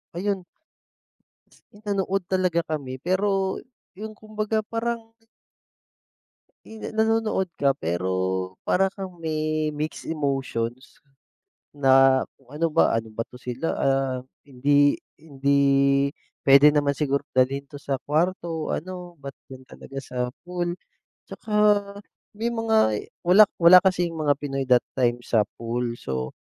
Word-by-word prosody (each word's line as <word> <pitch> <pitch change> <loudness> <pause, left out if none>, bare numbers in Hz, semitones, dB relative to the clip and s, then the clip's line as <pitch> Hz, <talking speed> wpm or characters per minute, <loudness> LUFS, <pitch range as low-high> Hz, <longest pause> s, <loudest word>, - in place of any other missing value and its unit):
ayun. 195 0 -2 1.3
Nanood 200 -2 -2
talaga 185 -2 +1
kami. 135 -4 -4
Pero 190 +4 0 0.3
yung 215 +3 -8
kumbaga 215 0 -2
parang 230 0 -4 1.5
yung 220 0 -7
nanonood 220 -3 +1
ka 140 -1 +3
pero 95 +2 -1 0.2
para 190 +1 +2
kang 190 -2 -8
may 155 -1 -1
mixed 150 +1 -4
emotions 135 -5 -3 0.7
na 135 -2 +5
kung 130 -2 -24
ano 155 +3 0
ba, 165 +1 +3
ano 115 0 -1
ba 115 - -1
'to 125 +2 -15
sila, 125 +6 -4
ah, 135 -1 +1 0.2
hindi 145 +1 +2 0.2
hindi 140 -1 +2 0.3
pwede 140 +1 +7
naman 145 -1 +2
siguro 140 -1 -1
dalhin 130 +2 +1
'to 140 +1 -12
sa 140 -1 -2
kwarto 165 +1 -1
o - - 0
ano, 180 0 -7
ba't 140 - -5 0.2
d'yan 130 -1 -11
talaga 135 +1 -9
sa 125 - -9 0.3
pool. 175 -1 -3 0.5
Tsaka 215 - -7 0.8
may 235 +2 -1
mga 220 - +2 0.2
wala 195 +3 +7
wala 175 +2 +9
kasing 180 -3 +1
mga 150 -2 +1
Pinoy 135 -2 -3
that 125 -1 +4
time 120 -2 +1
sa 110 -3 +3 0.2
pool. 120 +1 -3
So, 65 -1 -4
150 Hz, 125 wpm, -24 LUFS, 135-185 Hz, 1.5 s, wala